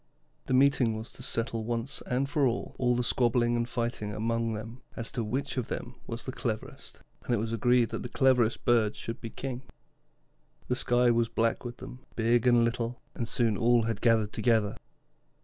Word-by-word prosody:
The 130 - +2
meeting 130 -4 +3
was 110 +1 -7
to - - -13
settle 115 -1 -1
once 120 +3 -3
and 130 +2 0
for 145 -1 +2
all 125 +1 0
the 125 - 0
squabbling 120 0 +2
and 120 0 -1
fighting 115 -3 -2
among 115 +1 -1
them 115 +4 -7
as 115 - -4
to 120 - -2
which 130 +5 -3
of 125 - -1
them 120 - -5
was 115 0 -6
the 130 - -3
cleverest, 115 -5 -5 0.2
and 120 - +1
it - - 0
was 110 +2 -2
agreed 120 +1 +3
that - - -4
the 120 - -6
cleverest 125 -3 +2
bird 115 -3 +3
should 115 +2 -6
be 115 - -5
king. 130 +1 -5 1.1
The 125 - +2
sky 120 0 +3
was 115 0 +2
black 115 0 0
with 120 -1 -6
them, 125 - -9 0.2
big 115 +1 +2
and 120 -1 +5
little, 115 +1 -2
and 115 - -3
soon 115 -3 +2
all 120 +2 +3
had 115 -2 -2
gathered 110 -3 +3
together. 110 -4 +2
120 Hz, 190 wpm, -29 LUFS, 115-125 Hz, 1.1 s, and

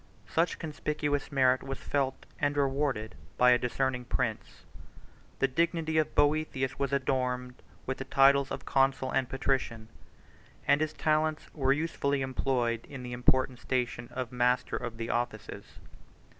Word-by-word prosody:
Such 165 +2 +1
conspicuous 150 -2 -2
merit 130 -2 +3
was 135 0 -5
felt 135 -2 -2
and 145 0 0
rewarded 135 -5 0 0.2
by 125 0 +6
a 125 - +5
discerning 125 0 -1
prince: 120 -3 -3 0.7
the 135 - +2
dignity 160 +2 +1
of 155 - -1
Boethius 145 -3 +1
was 140 -1 0
adorned 125 -2 -1 0.2
with 130 - -3
the 135 - -4
titles 135 0 +4
of - - -5
consul 135 -1 +2
and 130 -2 0
patrician, 130 -4 -1 0.8
and 145 +1 +4
his 155 -1 0
talents 155 0 0
were 135 -3 +1
usefully 140 -2 0
employed 125 -3 -1
in 135 -3 -7
the 125 0 -6
important 130 0 +2
station 120 -2 -2
of 125 -2 -4
master 125 0 +1
of 120 -2 -5
the 115 0 -3
offices. 120 -3 -3
135 Hz, 145 wpm, -30 LUFS, 125-145 Hz, 0.8 s, by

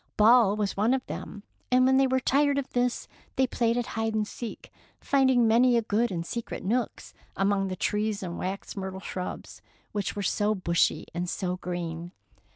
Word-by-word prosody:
Ball 220 -1 +6
was 210 -2 -1
one 220 +6 +3
of 260 - -4
them, 205 -1 -7 0.3
and 255 0 +4
when 265 0 +4
they 270 0 +4
were 260 0 +2
tired 280 +2 +2
of 275 -1 -1
this 245 0 0 0.3
they 265 - +3
played 235 -2 0
at 245 - 0
hide 225 0 -2
and 215 -1 0
seek, 235 0 -8 0.3
finding 260 -4 +3
many 240 +2 +5
good 225 +1 0
and 170 -2 -3
secret 235 +5 -5
nooks 235 +3 -2 0.2
among 195 0 +1
the 185 - -3
trees 210 +2 -1
and 175 -2 -5
wax 190 +2 -4
myrtle 190 -1 -5
shrubs, 185 -1 -6 0.3
which 205 -3 -2
were 205 - -3
so 210 +3 +1
bushy 170 -3 +1
and 175 +1 -2
so 180 -1 -2
green. 175 -1 -5
215 Hz, 180 wpm, -27 LUFS, 190-245 Hz, 0.3 s, Ball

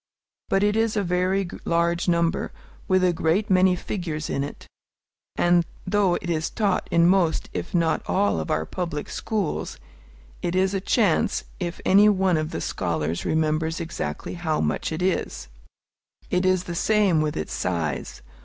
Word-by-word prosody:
But 195 - +2
it 205 0 +2
is 225 -1 +1
a 205 - +1
very 185 +2 +1 0.2
large 170 +1 +1
number, 170 0 +1 0.4
with 185 -2 +3
a 180 -1 +3
great 170 +6 0
many 185 0 +5
figures 170 -5 -4
in 140 - 0
it; 145 - -8 0.7
and 175 0 +3 0.2
though 195 -2 +2
it - - -5
is 160 -2 -1
taught 205 -4 0
in 170 0 +4
most 180 -3 +2
if - - -4
not 165 -2 +2
all 200 - +1
of 80 - -4
our 80 +1 0
public 165 - -4
schools, 210 -8 -3 0.6
it 175 - -2
is 190 +1 +2
a 195 - -1
chance 200 -4 +2 0.2
if 175 -2 -4
any 205 +2 +6
one 190 -4 +2
of 155 0 -2
the 85 - -4
scholars 80 +1 -2
remembers 160 +1 0
exactly 160 - -4
how 165 -3 -1
much 75 - -1
it 160 +3 -2
is. 65 - -1 0.8
It 180 +1 +2
is 185 -1 +2
the 175 - -5
same 195 -3 +2
with 150 -1 -1
its 80 - -4
size. 80 -7 -3
175 Hz, 165 wpm, -24 LUFS, 160-190 Hz, 0.8 s, any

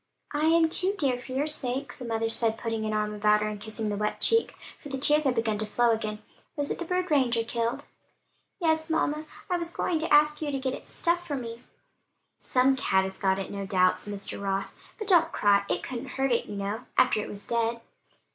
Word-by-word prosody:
"I 295 +1 +1
am 330 0 +5
too, 370 +5 +1
dear, 265 -7 +1
for 250 - -10
your 275 +3 +1
sake," 270 -3 -2
the 250 - -6
mother 225 -1 -1
said, 225 0 +2
putting 225 -1 -3
an 215 - -1
arm 210 0 -1
about 210 0 +3
her - - 0
and 210 -1 -5
kissing 220 0 -4
the 205 - -1
wet 210 +1 -2
cheek, 455 0 +3 0.3
for 290 - -9
the 270 - -3
tears 295 +3 +4
had 260 -2 +2
begun 220 -2 0
to 215 - -1
flow 235 +2 +2
again. 215 -1 -3 0.3
"Was 290 -1 -1
it - - -3
the 345 - -3
bird 360 0 -1
Ranger 250 -5 +3
killed?" 235 +4 -2 0.8
"Yes, 320 -2 +1
mamma, 310 -1 0 0.2
I 360 -2 0
was 340 -1 -3
going 340 -2 -1
to 325 - -3
ask 300 +1 +5
you 300 - -2
to 275 - -1
get 265 -1 -2
it - - -8
stuffed 345 +1 0
for 290 - -2
me." 235 -2 -6 0.8
"Some 260 +1 +3
cat 190 -8 +2
has 190 0 -5
got 190 -1 +2
it, 195 - -5
no 200 -1 -5
doubt," 185 -2 +3
said 205 - -1
Mr. 200 0 -5
Ross. 195 0 -2 0.2
"But 430 - -6
don't 335 -4 +5
cry: 200 -1 +3
it - - -1
couldn't 255 +1 -5
hurt 270 0 +1
it, 235 - +1
you 205 - -6
know, 200 +4 -4
after 250 -4 +4
it - - -6
was 205 0 -7
dead." 235 0 0
240 Hz, 230 wpm, -27 LUFS, 215-300 Hz, 0.8 s, am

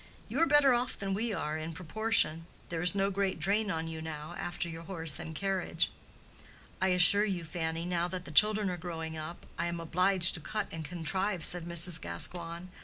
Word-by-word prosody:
You - - -3
are 330 - +4
better 285 -2 +5
off 245 +1 -1
than 195 -1 -3
we 225 +4 -2
are, 155 -6 -3
in 160 +1 -6
proportion; 170 -2 0 0.2
there 165 -1 -3
is 180 +3 +5
no 195 0 +1
great 195 -2 -1
drain 205 +6 +1
on 160 -3 -3
you 160 -1 -6
now, 155 0 -7
after 175 0 -4
your 165 0 -8
house 165 -5 +1
and 160 - -7
carriage." 190 -2 -1 0.9
"I 190 - +3
assure 180 +3 +5
you, 190 -5 -2
Fanny, 165 0 -4
now 175 -1 -1
that 180 0 -6
the - - -8
children 210 +3 +5
are 180 - -4
growing 160 -2 -6
up, 160 +2 -8
I 170 - 0
am 170 0 -4
obliged 180 +2 +4
to - - 0
cut 210 +7 -4
and 165 -1 -6
contrive," 180 +3 -2
said 175 -1 +2
Mrs. 170 -1 +3
Gascoigne. 170 - 0
175 Hz, 200 wpm, -30 LUFS, 165-195 Hz, 0.9 s, better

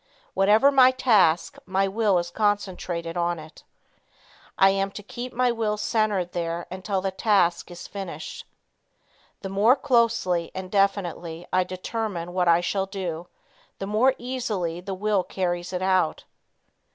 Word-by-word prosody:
Whatever 210 +8 +5
my 260 -2 +7
task, 205 -10 +2
my 190 +1 +1
will 205 -1 +2
is 175 0 -2
concentrated 185 -5 -2
on 175 0 0
it. 155 0 -12 0.9
I 195 0 +6
am 195 0 0
to 205 - -8
keep 245 +4 -7
my 250 0 +1
will 220 -2 -1
centered 210 -5 0
there 170 0 -3
until 190 +1 -2
the 190 0 -1
task 190 -3 +1
is 175 0 -9
finished. 195 -2 -7 0.9
The 195 - -5
more 205 +6 +4
closely 230 -10 +1
and 185 -1 -6
definitely 175 -4 -1
I 185 0 +4
determine 185 -1 -4
what 180 -1 +1
I 170 0 +5
shall 195 +2 -1
do, 175 -4 -5 0.5
the 195 - -5
more 225 +6 +2
easily 215 -9 -3
the 190 +1 -5
will 205 0 +1
carries 175 -1 -3
it 185 0 -3
out. 185 -4 +1
195 Hz, 145 wpm, -25 LUFS, 175-215 Hz, 0.9 s, my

